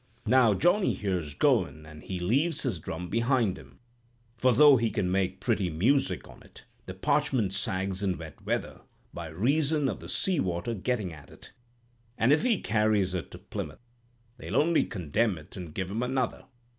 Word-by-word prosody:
Now 115 -2 +5
Johnny 180 - +2
here's 90 -8 -3
goin', 75 +2 +1
and 75 -1 -12
he 95 - -5
leaves 140 - +1
his 120 - -2
drum 80 +3 -5
behind 115 -2 +1
him; - - -15 0.6
for, 130 +3 +3
though 140 +3 +7
he 115 -1 +1
can 90 -4 -1
make 95 -1 0
pretty 105 -6 0
music 120 - +1
on - - -15
it, - - -16 0.2
the - - -6
parchment 105 -8 +1
sags 95 0 -2
in 95 -3 0
wet 80 -2 -10
weather, - - -3 0.3
by 85 -1 -6
reason 140 - +1
of - - -3
the - - -10
sea 185 -5 0
water 90 +3 -1
getting 105 -3 -2
at 75 -2 -13
it; - - -14 0.6
an' 115 +4 +3
if 150 - +4
he 235 -4 +2
carries 105 -4 +2
it 90 -2 -4
to - - -10
Plymouth, 120 - -7 0.5
they'll - - -6
only 165 +2 +3
condemn 95 +2 -1
it 75 - -13
and 90 -4 -7
give 95 0 -3
him 110 +4 -2
another. 125 -1 -1
105 Hz, 180 wpm, -28 LUFS, 90-130 Hz, 0.6 s, though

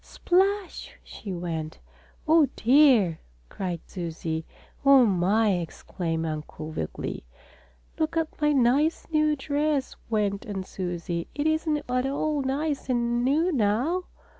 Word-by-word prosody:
"Splash!" 385 +1 0
she 200 - -8
went. 165 -3 -4 0.5
"Oh, 315 -2 +5
dear!" 240 - +4 0.3
cried 180 -4 -4
Susie. 165 -2 -4 0.4
"Oh, 275 -2 +7
my!" 205 +2 +2
exclaimed 165 0 -4
Uncle 155 0 -5
Wiggily. 80 - -5 0.8
"Look 315 +1 0
at 320 -1 -2
my 300 0 +4
nice, 280 +4 +2
new 305 -1 +3
dress," 290 0 -1
went 205 -2 0
on 195 -2 -4
Susie. 175 -2 -4
"It 290 - -2
isn't 315 -1 +1
at 250 +1 0
all 290 +1 -1
nice 275 +1 -2
and 240 -1 +1
new 310 +8 +2
now. 265 - +1
250 Hz, 120 wpm, -26 LUFS, -, 0.8 s, Oh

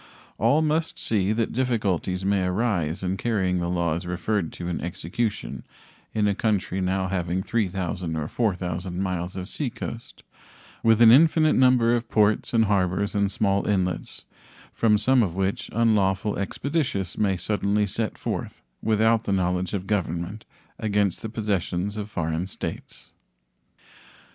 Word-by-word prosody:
All 155 +3 +3
must 160 +1 0
see 100 -3 +1
that 115 +1 0
difficulties 100 -7 0
may 100 -1 +2
arise 90 -4 0
in 95 +1 -1
carrying 95 -5 0
the 85 0 -2
laws 85 0 -1
referred 90 0 -1
to 85 - -6
into 90 - -3
execution 85 - -3 0.5
in 105 -1 +1
a 100 - +2
country 100 -3 -1
now 95 +1 0
having 90 0 -1
3,000 90 -6 -2
or 75 -1 -2
4,000 90 -4 -2
miles 90 -2 -2
of 95 -1 -5
seacoast, 120 -3 -6 0.6
with 115 0 +5
an 115 - +9
infinite 155 +3 +5
number 125 -2 +4
of 120 0 -3
ports 105 -1 +2
and 115 -2 +3
harbors 100 0 +1
and 100 -1 +1
small 100 0 +1
inlets, 95 -3 -1 0.5
from 110 -2 +3
some 125 +4 +4
of 90 -6 -1
which 95 +1 -1
unlawful 105 -3 +2
expeditious 100 - -2
may 95 -3 +1
suddenly 105 +2 0
set 105 +1 -3
forth, - - -5 0.2
without 110 +1 +2
the - - -1
knowledge 90 -1 0
of 95 -1 -4
Government, 95 0 -2 0.3
against 105 -3 0
the 110 - -5
possessions 100 -3 -2
of 105 0 -5
foreign 80 -1 -2
states. 95 - -7
100 Hz, 145 wpm, -25 LUFS, 90-110 Hz, 0.6 s, an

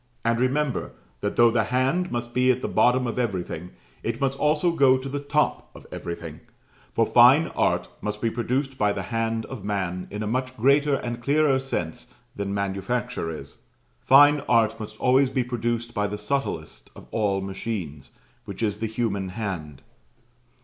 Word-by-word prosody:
And 115 0 +2
remember 135 +1 0 0.3
that 100 - -2
though 120 -1 +6
the 115 -2 +1
hand 130 +10 0
must 120 0 -4
be 125 0 +3
at 130 0 +2
the - - 0
bottom 125 +1 +3
of 120 +1 -3
everything, 90 -6 -3 0.3
it 115 0 -3
must 135 -1 0
also 150 +3 +2
go 135 -5 +4
to 130 +1 -6
the 140 +1 -3
top 145 +1 0
of - - -13
everything; 85 -2 -6 0.5
for 115 - +2
Fine 130 +9 +6
Art - - 0
must 105 0 -3
be 115 0 0
produced 130 +3 -2
by 105 -1 +2
the - - -4
hand 115 -1 -2
of 130 -7 -8
man 95 -3 -2
in 105 +1 -4
a - - -3
much 130 +3 -2
greater 140 +4 +3
and 120 -2 -4
clearer 140 +1 +3
sense 85 -12 -4 0.2
than 100 -1 -3
manufacture 100 +2 -2
is. 75 -4 -8 0.4
Fine 145 +2 +7
Art 115 -2 +3
must 110 0 -7
always 130 +1 +4
be 130 -1 0
produced 120 -1 -2
by 105 0 0
the 105 +1 -4
subtlest 105 - -3
of - - -12
all 100 -3 +1
machines, 95 - -5 0.4
which - - -6
is 105 -1 -1
the 115 - -1
human 105 -4 -2
hand. 90 -9 -5
115 Hz, 175 wpm, -25 LUFS, 100-130 Hz, 0.5 s, Fine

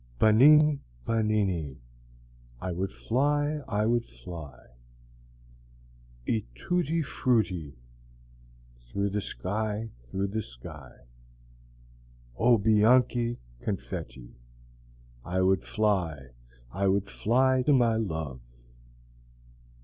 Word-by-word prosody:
Bananni, 145 +7 +6 0.3
bananni, 100 - 0 0.8
I 95 - -4
would 95 +3 -2
fly, 145 +4 0
I 105 0 0
would 120 +1 +2
fly, 65 - -11 1.6
E 110 -3 0
tutti 165 - 0
frutti 95 - 0 1.1
Through 100 +4 -1
the 105 +1 -1
sky, 105 +4 -3 0.2
through 95 +7 -2
the 110 +2 -2
sky, 65 - -12 1.3
O 120 - +4
bianchi 115 +3 +3 0.2
confetti! 65 - -5 0.9
I 90 +2 0
would 95 0 +3
fly, 90 -11 -1 0.4
I 100 +2 0
would 100 +1 +1
fly 130 +5 +2
to 135 - +2
my 120 -4 +4
love! 80 - -3
105 Hz, 90 wpm, -28 LUFS, 90-120 Hz, 1.6 s, Bananni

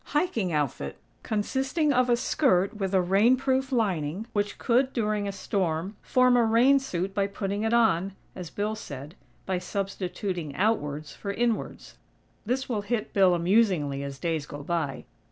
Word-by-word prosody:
hiking 270 - +1
outfit, 145 - -2 0.2
consisting 265 +8 0
of 255 -1 +2
a 240 - +4
skirt 200 - +2
with 195 -3 -2
a 190 - +4
rain 205 +8 +4
proof 265 0 0
lining, 190 - 0
which 205 -1 -1
could, 255 +3 +2
during 210 -3 0
a - - -1
storm, 190 -1 -2
form 255 -1 +3
a 240 - +5
rain 240 +5 +5
suit 190 -7 -3
by 200 -1 +1
putting 200 0 -3
it 225 0 0
on, 195 -5 +2 0.2
as 180 -3 -7
Bill 210 +5 -2
said, 145 -7 -8 0.3
"by 185 -1 -1
substituting 185 -5 -4
outwards 155 -7 -1
for 200 - -5
inwards." 235 +2 -2 0.5
(This 260 +3 -1
will 220 -5 -1
hit 215 +1 -3
Bill 190 -3 +5
amusingly, 170 -6 +2
as 140 -1 -6
days 160 -2 -2
go 145 0 -8
by!) 155 -4 -2
200 Hz, 160 wpm, -27 LUFS, 175-235 Hz, 0.5 s, a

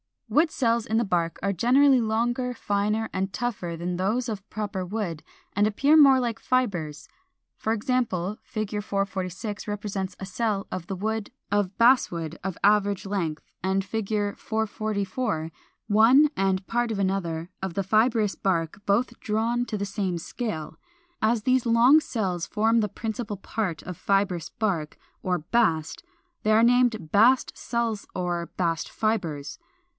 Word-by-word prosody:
411. 300 - +5
Wood 335 - -3
cells 235 -3 +1
in 220 - +1
the 235 - +3
bark 170 -5 0
are 200 0 +1
generally 260 - +5
longer, 240 +3 0
finer, 210 0 -1
and 190 +1 -2
tougher 200 -8 -3
than 175 +1 -3
those 220 +7 0
of 215 -3 -3
the - - -35
proper 205 -3 -3
wood, 180 -5 -4 0.3
and 205 +1 +3
appear 275 +8 +3
more 275 -3 +7
like 230 -2 -2
fibres. 190 - -1 0.5
For 220 - 0
example, 215 -5 -1
Fig. 215 -4 -4
446 200 +1 -3
represents 200 -2 -3
a 190 - -5
cell 200 0 -2
of 180 -2 -5
the 195 - -3
wood 220 +2 -3 0.2
of 205 -2 0
Basswood 175 - +3
of 190 -3 -3
average 205 -1 +3
length, 175 -6 -2 0.2
and 190 +1 0
Fig. 215 0 -3 0.3
444 215 -4 -2 0.4
one 235 +8 +6
(and 190 0 0
part 240 +1 0
of 215 - -2
another) 180 -4 -1
of 190 -2 -3
the 195 - 0
fibrous 220 +1 +2
bark, 170 -1 -1
both 235 +4 +1
drawn 230 +3 0
to 215 - -3
the 200 - -2
same 195 -3 -2
scale. 165 -3 -5 0.4
As 220 0 +2
these 255 0 +2
long 240 +6 +6
cells 190 - -2
form 225 +2 +2
the 210 -2 0
principal 220 0 -4
part 195 -4 -3
of 180 -2 -7
fibrous 195 -4 0
bark, 175 -8 -2 0.2
or 180 -1 0
bast, 165 -4 0 0.4
they 215 - +3
are 220 +1 +5
named 240 -8 +3
Bast 245 +6 +4
cells 230 -3 -2
or 175 -2 -2
Bast 165 -3 -1
fibres. 170 -10 -2
205 Hz, 155 wpm, -26 LUFS, 185-230 Hz, 0.5 s, more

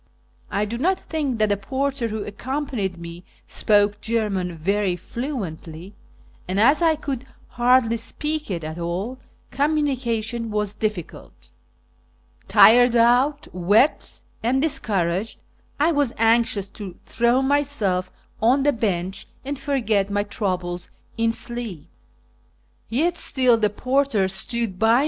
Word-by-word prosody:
I 205 +1 0
do 235 +3 -5
not 370 +7 +1
think 290 -6 -2
that 215 -1 +2
the 205 - +1
porter 265 +3 -2
who 215 -1 -4
accompanied 235 -4 -3
me 170 +1 -9 0.2
spoke 205 0 +2
German 200 -6 -1
very 195 +2 0
fluently, 185 - -6 0.5
and, 185 +2 -1
as 275 +9 +5
I 325 -2 +4
could 275 -4 -5 0.2
hardly 240 -1 +3
speak 300 +6 -3
it 170 -4 -3
at 155 +2 -6
all, 185 +10 -3 0.3
communication 250 -6 -1
was 210 -1 -1
difficult. 210 -6 -5 1.0
Tired 245 +1 +7
out, 245 +5 +3
wet, 205 - +2 0.2
and 245 +4 +1
dis 310 +1 +1
couraged, 190 +1 -1 0.4
I 310 +4 +4
was 285 -6 +1
anxious 225 -3 +2
to 195 -3 -8
throw 240 +3 +2
myself 265 -10 0 0.3
on 255 +5 +4
the 290 0 +3
bench 190 -4 -2 0.2
and 280 0 -4
forget 220 -8 0
my 205 0 0
troubles 185 -4 -2 0.3
in 230 0 +1
sleep. 230 - -6 1.0
Yet 330 +9 +1
still 255 -3 +3
the 215 -2 +1
porter 255 -2 +1
stood 190 0 -1
by 225 +1 +4
37 - - +6
57S - - +4
225 Hz, 130 wpm, -23 LUFS, 195-265 Hz, 1.0 s, Tired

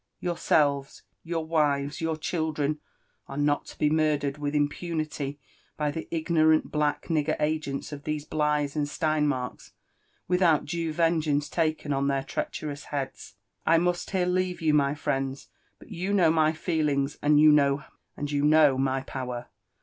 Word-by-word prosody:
Yourselves, 145 -5 0 0.2
your 165 -1 -3
wives, 145 -3 0
your 160 -1 -1
children 155 -2 -1 0.5
are 135 - -7
not 145 0 +1
to - - -11
be 150 - +2
murdered 150 -2 +1
with 145 0 -2
impunity 150 -1 -2 0.4
by 150 -1 0
the 160 +2 -6
ignorant 160 -1 +2
black 150 -1 0
nigger 155 -2 0
agents 150 -2 -2
of 145 -1 -7
these 150 -1 -3
Blighs 150 -2 0
and 145 -1 -1
Steinmirks, 150 -5 -1 0.5
without 180 -4 +3
due 165 +1 -2
vengeance 155 -3 +1
taken 155 -3 -1
on 140 0 0
llieir 135 -1 0
treacherous 145 0 -4
heads. 140 -2 -5
— - - -54
I 165 - +6
must 175 +1 0
here 185 -3 +1
leave 180 0 0
you, 155 -2 +2
my 140 -1 +3
friends; 135 -2 -3 0.3
but - - -16
you 190 +2 -2
know 175 -5 +5
my 155 -1 +3
feelings, 150 -4 -1
and 145 0 +4
you 155 0 +8
know 140 -1 +3 1.0
my 135 0 +1
power. 125 -2 -6
150 Hz, 150 wpm, -27 LUFS, 145-160 Hz, 1.0 s, you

